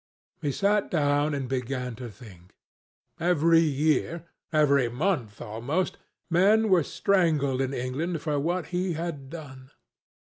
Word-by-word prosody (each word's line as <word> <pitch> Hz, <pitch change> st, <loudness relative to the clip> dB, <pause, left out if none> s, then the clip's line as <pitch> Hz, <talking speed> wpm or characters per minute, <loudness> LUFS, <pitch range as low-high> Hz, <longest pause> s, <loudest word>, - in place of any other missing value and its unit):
He 145 Hz, -, 0 dB
sat 200 Hz, +6 st, +1 dB
down 145 Hz, -2 st, +1 dB
and 135 Hz, -2 st, -3 dB
began 125 Hz, -1 st, -3 dB
to 125 Hz, -1 st, -7 dB
think. 95 Hz, -5 st, -15 dB, 0.6 s
Every 165 Hz, -1 st, +4 dB
year—every 150 Hz, -2 st, +1 dB
month, 125 Hz, -, -1 dB
almost—men 180 Hz, -, 0 dB
were 185 Hz, -3 st, +5 dB
strangled 155 Hz, -9 st, +1 dB
in 135 Hz, 0 st, -1 dB
England 140 Hz, +7 st, -2 dB
for 150 Hz, -2 st, 0 dB
what 175 Hz, +4 st, -1 dB
he 180 Hz, 0 st, 0 dB
had 155 Hz, -4 st, -5 dB
done. 135 Hz, -5 st, -10 dB
150 Hz, 115 wpm, -27 LUFS, 130-170 Hz, 0.6 s, were